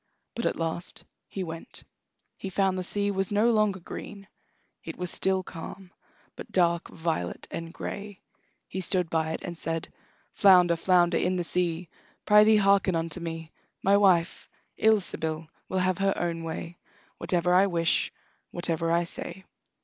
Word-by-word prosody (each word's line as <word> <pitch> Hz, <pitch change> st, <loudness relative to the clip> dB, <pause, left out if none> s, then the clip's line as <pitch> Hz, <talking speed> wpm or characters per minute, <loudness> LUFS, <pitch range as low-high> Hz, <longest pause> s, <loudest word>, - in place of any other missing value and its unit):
But 235 Hz, -, -1 dB
at -, -, -1 dB
last 165 Hz, +1 st, -3 dB, 0.2 s
he 195 Hz, -, -4 dB
went. 165 Hz, +7 st, -8 dB, 0.5 s
He 195 Hz, -, -6 dB
found 190 Hz, 0 st, +1 dB
the 185 Hz, -, -2 dB
sea 205 Hz, +2 st, 0 dB
was 195 Hz, -1 st, -1 dB
no 210 Hz, +3 st, +3 dB
longer 215 Hz, -3 st, +2 dB
green; 195 Hz, +3 st, -9 dB, 0.6 s
it -, -, -7 dB
was 180 Hz, -1 st, -1 dB
still 190 Hz, -1 st, +1 dB
calm, 180 Hz, +2 st, -9 dB, 0.4 s
but -, -, -10 dB
dark 170 Hz, -2 st, +2 dB
violet 160 Hz, -, -3 dB
and 165 Hz, 0 st, -5 dB
gray. 200 Hz, +2 st, -7 dB, 0.5 s
He 190 Hz, -, -4 dB
stood 180 Hz, -2 st, 0 dB
by 160 Hz, -1 st, 0 dB
it -, -, -5 dB
and 175 Hz, -2 st, -5 dB
said: 165 Hz, -1 st, -3 dB, 0.4 s
"Flounder, 180 Hz, -4 st, +6 dB
flounder 175 Hz, 0 st, +3 dB
in 185 Hz, +1 st, +1 dB
the 180 Hz, -, -1 dB
sea, 175 Hz, 0 st, -1 dB, 0.4 s
Prythee, 215 Hz, +1 st, +6 dB
hearken 195 Hz, -2 st, +3 dB
unto 165 Hz, +1 st, -2 dB
me: 165 Hz, -1 st, -6 dB, 0.3 s
My 195 Hz, +1 st, +5 dB
wife, 185 Hz, -4 st, +3 dB, 0.3 s
Ilsebil, 165 Hz, -7 st, +1 dB, 0.2 s
will 190 Hz, -, -1 dB
have 185 Hz, 0 st, +1 dB
her 195 Hz, 0 st, +1 dB
own 170 Hz, -1 st, -2 dB
way 165 Hz, +1 st, -6 dB, 0.4 s
Whatever 175 Hz, +1 st, +1 dB
I 190 Hz, +2 st, +5 dB
wish, 170 Hz, -3 st, +1 dB, 0.4 s
whatever 165 Hz, -1 st, -1 dB
I 170 Hz, +1 st, +3 dB
say." 190 Hz, +2 st, -7 dB
180 Hz, 155 wpm, -27 LUFS, 165-195 Hz, 0.6 s, Flounder